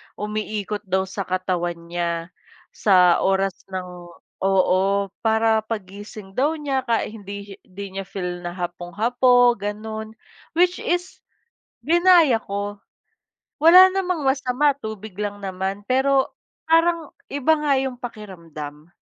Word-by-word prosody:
umiikot 210 Hz, 0 st, -3 dB
daw 190 Hz, +1 st, +1 dB
sa 195 Hz, +1 st, -5 dB
katawan 180 Hz, -2 st, -1 dB, 0.2 s
niya 170 Hz, 0 st, -2 dB, 0.4 s
sa 180 Hz, -4 st, +4 dB
oras 195 Hz, 0 st, +2 dB, 0.2 s
ng 185 Hz, -1 st, -5 dB, 0.6 s
oo, 195 Hz, +1 st, +2 dB
para 220 Hz, 0 st, +2 dB
paggising 205 Hz, -1 st, -7 dB
daw 285 Hz, +10 st, +1 dB
niya 275 Hz, -4 st, -2 dB
kahi 230 Hz, -2 st, 0 dB
hindi 200 Hz, 0 st, -8 dB, 0.3 s
hindi 200 Hz, +2 st, -8 dB
niya 195 Hz, -, -5 dB
feel 180 Hz, -3 st, -4 dB
na 175 Hz, 0 st, -6 dB
hapong-hapo 230 Hz, +8 st, +2 dB
gano'n 215 Hz, +2 st, -5 dB, 0.4 s
which 355 Hz, +2 st, +3 dB
is 355 Hz, +1 st, -2 dB, 0.7 s
ginaya 340 Hz, -7 st, +5 dB
ko 200 Hz, 0 st, -5 dB, 0.7 s
wala 345 Hz, +5 st, +8 dB
namang 365 Hz, -6 st, -1 dB
masama, 270 Hz, +1 st, +2 dB
tubig 220 Hz, -6 st, -8 dB
lang 205 Hz, 0 st, -4 dB
naman 190 Hz, 0 st, -3 dB
pero 265 Hz, +1 st, +3 dB, 0.4 s
parang 330 Hz, -1 st, +2 dB, 0.2 s
iba 285 Hz, +3 st, +2 dB
nga 300 Hz, -2 st, +1 dB
yung 265 Hz, -1 st, -2 dB
pakiramdam. 170 Hz, -10 st, -9 dB
210 Hz, 115 wpm, -22 LUFS, 190-265 Hz, 0.7 s, wala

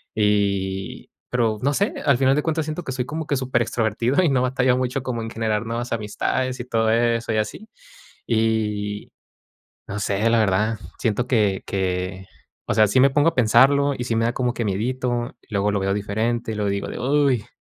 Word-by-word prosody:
y 100 Hz, -2 st, 0 dB, 0.2 s
pero 115 Hz, -3 st, +1 dB
no 140 Hz, +2 st, +2 dB
sé, 200 Hz, +7 st, 0 dB
al 140 Hz, -4 st, +4 dB
final 135 Hz, +1 st, +3 dB
de 150 Hz, -, 0 dB
cuentas 160 Hz, -1 st, 0 dB
siento 155 Hz, +3 st, -4 dB
que 130 Hz, -, -5 dB
soy 125 Hz, -1 st, -1 dB
como 155 Hz, +3 st, -5 dB
que 145 Hz, -, +1 dB
superextrovertido 120 Hz, -, 0 dB
y 170 Hz, -, +3 dB
no 130 Hz, -2 st, +2 dB
batallo 125 Hz, 0 st, +2 dB
mucho 130 Hz, +1 st, -2 dB
como 125 Hz, -3 st, -3 dB
en 115 Hz, -, -5 dB
generar 110 Hz, -1 st, -1 dB
nuevas 120 Hz, +2 st, -4 dB
amistades 125 Hz, +4 st, -2 dB
y -, -, -7 dB
todo 115 Hz, -3 st, +1 dB
eso, 115 Hz, 0 st, +1 dB
y -, -, 0 dB
así. 110 Hz, -, -3 dB, 0.6 s
Y, 105 Hz, -2 st, -1 dB, 0.8 s
no 100 Hz, -, -4 dB
sé, 100 Hz, +2 st, +1 dB
la 115 Hz, -, +3 dB
verdad, 105 Hz, +2 st, +1 dB, 0.2 s
siento 115 Hz, +2 st, 0 dB
que 105 Hz, -6 st, +1 dB
que, 95 Hz, 0 st, -2 dB, 0.4 s
o -, -, 0 dB
sea, 110 Hz, -, +5 dB
sí 130 Hz, +6 st, +3 dB
me 135 Hz, -, +7 dB
pongo 145 Hz, +3 st, +3 dB
a -, -, -17 dB
pensarlo 135 Hz, +4 st, +4 dB
y 120 Hz, -, -3 dB
sí 115 Hz, -2 st, -1 dB
me 115 Hz, 0 st, +2 dB
da 120 Hz, -, 0 dB
como 125 Hz, -1 st, 0 dB
que 120 Hz, -, -2 dB
miedito, 120 Hz, +4 st, -2 dB, 0.2 s
luego 100 Hz, 0 st, +1 dB
lo 100 Hz, -, 0 dB
veo 95 Hz, 0 st, 0 dB
diferente 110 Hz, +3 st, -2 dB
y -, -, -5 dB
luego 105 Hz, -1 st, -1 dB
digo 100 Hz, 0 st, -2 dB
de: -, -, -6 dB
"Uy, 135 Hz, -4 st, +2 dB
115 Hz, 200 wpm, -22 LUFS, 105-130 Hz, 0.8 s, me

